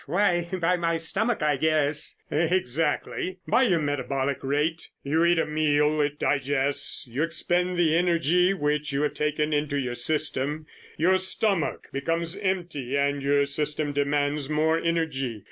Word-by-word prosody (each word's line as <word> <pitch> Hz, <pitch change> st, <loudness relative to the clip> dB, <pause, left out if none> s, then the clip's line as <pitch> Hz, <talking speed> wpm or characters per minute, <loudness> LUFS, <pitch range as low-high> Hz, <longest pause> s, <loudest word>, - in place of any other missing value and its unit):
"Why, 175 Hz, +1 st, +1 dB
by 180 Hz, -1 st, +1 dB
my 170 Hz, -1 st, 0 dB
stomach, 200 Hz, +5 st, 0 dB
I 150 Hz, -2 st, +2 dB
guess." 155 Hz, 0 st, +1 dB
"Exactly. 165 Hz, +2 st, -1 dB
By -, -, +3 dB
your 180 Hz, -5 st, +3 dB
metabolic 140 Hz, -2 st, -1 dB
rate. 150 Hz, +4 st, -1 dB
You 155 Hz, +4 st, +1 dB
eat 175 Hz, 0 st, +3 dB
a 165 Hz, -, +2 dB
meal, 150 Hz, 0 st, +1 dB
it 145 Hz, 0 st, -1 dB
digests, 140 Hz, -1 st, 0 dB
you 125 Hz, +3 st, -4 dB
expend 175 Hz, +2 st, 0 dB
the 165 Hz, -2 st, +3 dB
energy 175 Hz, +1 st, +3 dB
which 150 Hz, -5 st, -1 dB
you 140 Hz, +1 st, 0 dB
have 150 Hz, -, 0 dB
taken 150 Hz, 0 st, -1 dB
into 145 Hz, -1 st, 0 dB
your 125 Hz, -3 st, -3 dB
system, 150 Hz, +3 st, -1 dB, 0.3 s
your 185 Hz, +4 st, +3 dB
stomach 190 Hz, -2 st, -1 dB
becomes 165 Hz, +5 st, -1 dB
empty 175 Hz, -9 st, -2 dB
and 140 Hz, 0 st, 0 dB
your 140 Hz, +1 st, +2 dB
system 150 Hz, +1 st, -2 dB
demands 145 Hz, 0 st, 0 dB
more 160 Hz, +1 st, +2 dB
energy. 150 Hz, -9 st, -1 dB
150 Hz, 145 wpm, -26 LUFS, 145-170 Hz, 0.3 s, By